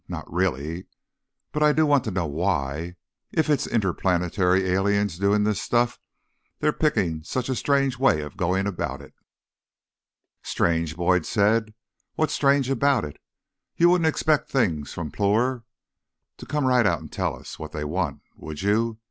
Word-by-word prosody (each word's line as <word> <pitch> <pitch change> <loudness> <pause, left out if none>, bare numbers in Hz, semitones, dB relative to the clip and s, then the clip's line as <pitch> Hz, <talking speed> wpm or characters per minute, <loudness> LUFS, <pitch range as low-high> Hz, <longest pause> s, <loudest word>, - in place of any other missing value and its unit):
Not - - -6
really. 85 -1 -2 0.6
But 150 - -3
I 150 0 +5
do 155 +1 +3
want 145 -3 +3
to - - -2
know 90 -2 -1
why, 80 0 -2 0.4
if 160 -2 +1
it's 140 -2 +1
interplanetary 95 -2 +1
aliens 100 -1 +1
doing 100 +1 +2
this 105 -2 0
stuff, 120 0 +1 0.6
they're 150 - +1
picking 100 - 0
such 125 +10 -3
a 130 - 0
strange 135 -1 +1
way 130 - +3
of 75 +5 -8
going 95 +1 0
about 70 -8 -3
it." - - -15 1.3
"Strange?" 85 -2 0
Boyd 85 0 +1
said. 110 +1 +1 0.4
"What's 155 - 0
strange 140 -2 +3
about 135 -2 +2
it? 75 - -9 0.6
You 170 +1 +5
wouldn't 175 -3 +3
expect 155 -1 +1
Things 85 - 0
from 80 -3 -5
Ploor 115 +4 +1 0.7
to - - -11
come 150 -1 -1
right 125 -4 +4
out - - +1
and - - -11
tell - - -2
us - - -11
what - - -7
they 75 - -4
want, 80 -1 -2
would 75 +2 -8
you? 110 +2 +1
100 Hz, 160 wpm, -24 LUFS, 85-130 Hz, 1.3 s, I